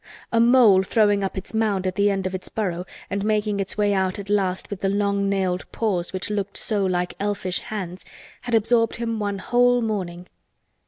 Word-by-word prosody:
A 230 Hz, -, +3 dB
mole 235 Hz, -5 st, +6 dB
throwing 205 Hz, 0 st, +2 dB
up 195 Hz, -, -3 dB
its 190 Hz, -, -6 dB
mound 210 Hz, -4 st, 0 dB
at 185 Hz, -, 0 dB
the 205 Hz, +1 st, +2 dB
end 195 Hz, -1 st, -1 dB
of 185 Hz, -, -2 dB
its 185 Hz, -, -5 dB
burrow 180 Hz, -4 st, -3 dB, 0.2 s
and 200 Hz, 0 st, -1 dB
making 210 Hz, -1 st, 0 dB
its 195 Hz, +1 st, -2 dB
way 205 Hz, -1 st, +2 dB
out 190 Hz, -1 st, 0 dB
at 200 Hz, 0 st, -6 dB
last 190 Hz, -2 st, 0 dB
with 200 Hz, -, -5 dB
the 195 Hz, -, +1 dB
long 200 Hz, 0 st, +1 dB
nailed 190 Hz, -2 st, -1 dB
paws 185 Hz, -6 st, -1 dB
which 190 Hz, +2 st, -4 dB
looked 200 Hz, -1 st, -3 dB
so 210 Hz, -3 st, 0 dB
like 180 Hz, -1 st, 0 dB
elfish 200 Hz, -2 st, -1 dB
hands, 185 Hz, -4 st, -6 dB, 0.4 s
had 245 Hz, -2 st, -1 dB
absorbed 230 Hz, +1 st, +2 dB
him 230 Hz, -1 st, -3 dB
one 205 Hz, -1 st, -2 dB
whole 245 Hz, +4 st, +3 dB
morning. 185 Hz, -6 st, -3 dB
200 Hz, 200 wpm, -23 LUFS, 190-215 Hz, 0.4 s, mole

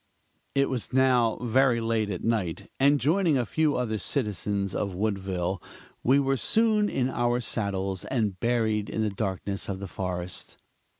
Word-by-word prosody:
It 140 Hz, 0 st, +3 dB
was 125 Hz, -4 st, -2 dB
now 125 Hz, -3 st, +3 dB
very 125 Hz, 0 st, +3 dB
late 115 Hz, -2 st, 0 dB
at 90 Hz, -3 st, -4 dB
night; 100 Hz, -4 st, -1 dB
and 140 Hz, +2 st, +5 dB
joining 160 Hz, +2 st, +3 dB
a 125 Hz, -, 0 dB
few 155 Hz, +5 st, +1 dB
other 110 Hz, -4 st, -1 dB
citizens 100 Hz, -, -1 dB
of 100 Hz, -3 st, -2 dB
Woodville, 95 Hz, -3 st, -1 dB, 0.4 s
we 130 Hz, +3 st, +4 dB
were 135 Hz, -1 st, +1 dB
soon 215 Hz, -, +2 dB
in 130 Hz, -1 st, 0 dB
our 120 Hz, -1 st, +1 dB
saddles 100 Hz, -5 st, -2 dB
and 105 Hz, -7 st, -1 dB
buried 110 Hz, -3 st, +1 dB
in 110 Hz, -, -1 dB
the 105 Hz, -, 0 dB
darkness 100 Hz, 0 st, -3 dB
of 95 Hz, -1 st, -3 dB
the 100 Hz, -, -5 dB
forest. 90 Hz, -1 st, -4 dB
110 Hz, 160 wpm, -27 LUFS, 100-130 Hz, 0.4 s, and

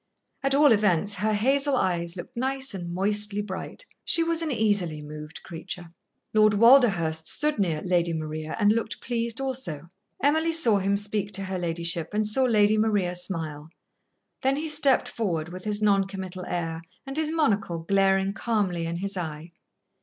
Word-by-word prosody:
At 275 Hz, 0 st, +1 dB
all 290 Hz, -1 st, +6 dB
events, 205 Hz, -2 st, +2 dB
her 210 Hz, +3 st, -1 dB
hazel 275 Hz, +6 st, +2 dB
eyes 170 Hz, -5 st, -1 dB
looked 185 Hz, +8 st, -9 dB
nice 265 Hz, +1 st, 0 dB
and 175 Hz, -3 st, -6 dB
moistly 205 Hz, +2 st, +1 dB
bright. 205 Hz, -, -7 dB, 0.2 s
She 335 Hz, -, +2 dB
was 335 Hz, 0 st, +2 dB
an 325 Hz, -, -2 dB
easily 205 Hz, -, 0 dB
moved 150 Hz, +1 st, -9 dB
creature. 175 Hz, 0 st, -8 dB, 0.4 s
Lord 215 Hz, -1 st, +4 dB
Walderhurst 200 Hz, -10 st, +4 dB
stood 300 Hz, -5 st, +1 dB
near 165 Hz, -6 st, 0 dB
Lady 175 Hz, -2 st, +1 dB
Maria 155 Hz, -1 st, -4 dB
and 205 Hz, -1 st, +4 dB
looked 225 Hz, 0 st, -2 dB
pleased 235 Hz, 0 st, -2 dB
also. 190 Hz, -, -4 dB, 0.3 s
Emily 315 Hz, +3 st, +2 dB
saw 235 Hz, -11 st, +5 dB
him 200 Hz, +1 st, +1 dB
speak 205 Hz, 0 st, -1 dB
to 195 Hz, +1 st, -1 dB
her 190 Hz, -1 st, -4 dB
ladyship 170 Hz, +1 st, -2 dB
and 215 Hz, 0 st, +1 dB
saw 235 Hz, +5 st, +2 dB
Lady 215 Hz, -2 st, +3 dB
Maria 205 Hz, -5 st, +1 dB
smile. 160 Hz, -4 st, -3 dB, 0.7 s
Then 265 Hz, +1 st, +2 dB
he 310 Hz, +2 st, -3 dB
stepped 290 Hz, -3 st, +3 dB
forward, 170 Hz, -8 st, -3 dB
with 185 Hz, +2 st, -9 dB
his 210 Hz, 0 st, -1 dB
non 200 Hz, -2 st, +3 dB
committal 185 Hz, -2 st, -7 dB
air 165 Hz, -2 st, -3 dB, 0.2 s
and 270 Hz, 0 st, -7 dB
his 310 Hz, 0 st, 0 dB
monocle 220 Hz, -, 0 dB
glaring 195 Hz, +3 st, +1 dB
calmly 195 Hz, -8 st, -1 dB
in 165 Hz, -, -3 dB
his 195 Hz, +3 st, -4 dB
eye. 160 Hz, -2 st, -6 dB
200 Hz, 170 wpm, -26 LUFS, 175-235 Hz, 0.7 s, all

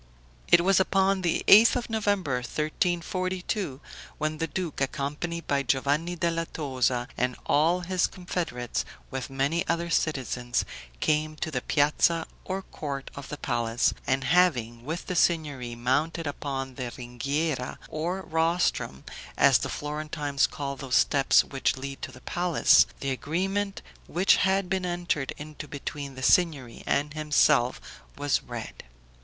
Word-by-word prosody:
It 170 Hz, -, +6 dB
was 195 Hz, +2 st, +4 dB
upon 190 Hz, 0 st, +2 dB
the 170 Hz, -2 st, 0 dB
8th 220 Hz, +4 st, +8 dB
of 245 Hz, -1 st, -2 dB
November, 205 Hz, -, 0 dB
1342, 175 Hz, -, -2 dB, 0.4 s
when 155 Hz, 0 st, -2 dB
the 165 Hz, -, 0 dB
duke, 170 Hz, -3 st, -4 dB
accompanied 150 Hz, +5 st, -2 dB
by 140 Hz, -1 st, +1 dB
Giovanni 140 Hz, +6 st, 0 dB
della 165 Hz, -1 st, -1 dB
Tosa 130 Hz, -4 st, -1 dB
and 125 Hz, 0 st, 0 dB
all 165 Hz, +5 st, +3 dB
his 180 Hz, +1 st, +1 dB
confederates, 170 Hz, -10 st, -3 dB, 0.3 s
with 135 Hz, 0 st, -4 dB
many 140 Hz, +5 st, 0 dB
other 170 Hz, 0 st, -1 dB
citizens, 125 Hz, -6 st, 0 dB, 0.4 s
came 155 Hz, 0 st, +1 dB
to 160 Hz, +1 st, -4 dB
the 125 Hz, -4 st, -1 dB
piazza 155 Hz, +4 st, +2 dB, 0.2 s
or 190 Hz, +1 st, -4 dB
court 140 Hz, -6 st, -6 dB
of 140 Hz, -, -9 dB
the 150 Hz, -, -5 dB
palace, 120 Hz, -3 st, 0 dB
and 135 Hz, 0 st, +1 dB
having, 125 Hz, -11 st, +2 dB
with 160 Hz, +4 st, -4 dB
the 180 Hz, -, -3 dB
Signory 145 Hz, -8 st, +1 dB
mounted 145 Hz, +8 st, 0 dB
upon 135 Hz, -2 st, -4 dB
the 125 Hz, -1 st, -4 dB
ringhiera, 130 Hz, +3 st, -2 dB
or 175 Hz, +5 st, -3 dB
rostrum 160 Hz, -, 0 dB, 0.3 s
(as -, -, +6 dB
the -, -, -3 dB
Florentines 150 Hz, -1 st, -1 dB
call 140 Hz, -1 st, -4 dB
those 135 Hz, -2 st, -2 dB
steps 140 Hz, -1 st, +4 dB
which 135 Hz, -1 st, -1 dB
lead 135 Hz, +1 st, -6 dB
to -, -, -5 dB
the 130 Hz, 0 st, -14 dB
palace), 175 Hz, +2 st, +4 dB
the 135 Hz, -, -1 dB
agreement 195 Hz, +9 st, -2 dB, 0.2 s
which 180 Hz, +3 st, +4 dB
had 195 Hz, -1 st, +2 dB
been 190 Hz, 0 st, -1 dB
entered 175 Hz, -6 st, -1 dB
into 150 Hz, 0 st, -8 dB
between 140 Hz, -1 st, -6 dB
the 130 Hz, -, -7 dB
Signory 140 Hz, -5 st, +2 dB
and 145 Hz, +1 st, +1 dB
himself 150 Hz, -5 st, +3 dB, 0.4 s
was -, -, +1 dB
read. -, -, -8 dB
150 Hz, 140 wpm, -27 LUFS, 135-175 Hz, 0.4 s, 8th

